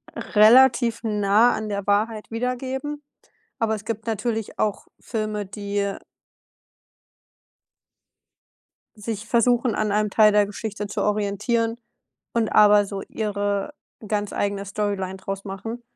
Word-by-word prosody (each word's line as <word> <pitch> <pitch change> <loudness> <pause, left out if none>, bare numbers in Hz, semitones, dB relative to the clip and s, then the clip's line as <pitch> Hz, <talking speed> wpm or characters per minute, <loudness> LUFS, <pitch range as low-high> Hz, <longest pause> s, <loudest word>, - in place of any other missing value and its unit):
relativ 235 +1 +5
nah 210 +1 +3
an 215 0 -4
der 200 -1 -3
Wahrheit 215 +2 0
wiedergeben. 260 +5 -3 0.6
Aber 220 -1 +1
es 215 +1 -9
gibt 225 0 -5
natürlich 225 0 -3
auch 210 -2 -1
Filme, 215 -2 -3
die, 200 +1 -4
äh 200 -1 -2 3.0
Sich 215 0 -6
versuchen, 240 +1 +2
an 215 -1 0
einem 210 +1 +1
Teil 215 +1 +5
der 205 0 +4
Geschichte 205 0 -5
zu - - -3
orientieren, 215 +3 0 0.6
und 230 -2 +1
aber 210 -1 +6
so 195 0 -6
ihre 205 0 -2 0.4
ganz 205 -1 -2
eigene 200 0 -2
Storyline 195 -2 -3
draus 195 0 -6
machen. 225 +5 -6
210 Hz, 120 wpm, -23 LUFS, 205-230 Hz, 3.0 s, aber